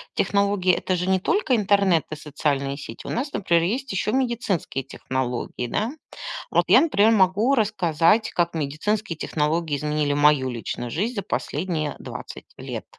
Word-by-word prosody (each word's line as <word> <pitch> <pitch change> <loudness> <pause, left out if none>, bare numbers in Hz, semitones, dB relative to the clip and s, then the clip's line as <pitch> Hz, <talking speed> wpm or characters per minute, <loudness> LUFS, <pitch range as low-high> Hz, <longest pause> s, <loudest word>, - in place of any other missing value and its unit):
технологии- 200 -2 +2
это 185 - 0
же 180 +1 -2
не 190 -1 +3
только 265 - +1
интернет 200 -5 +3
и - - -3
социальные 140 -2 -2
сети. 115 -5 -9
У - - -4
нас, 275 +5 -2
например, 170 -4 +2
есть 250 +8 -2
еще 195 +2 -1
медицинские 235 - -1
технологии, 125 -2 -4
да. 220 - -1 0.6
Вот - - +3
я, - - +7
например, 225 -9 +4
могу 210 +6 +3
рассказать, 205 -1 +2
как 170 -1 0
медицинские 165 +6 -2
технологии 155 0 -1
изменили 150 0 -1
мою 145 -3 +3
личную 120 0 -5
жизнь 220 - -2
за 200 - -1
последние 150 +4 -2
20 - - -9
лет. - - -6
175 Hz, 150 wpm, -24 LUFS, 150-210 Hz, 0.6 s, я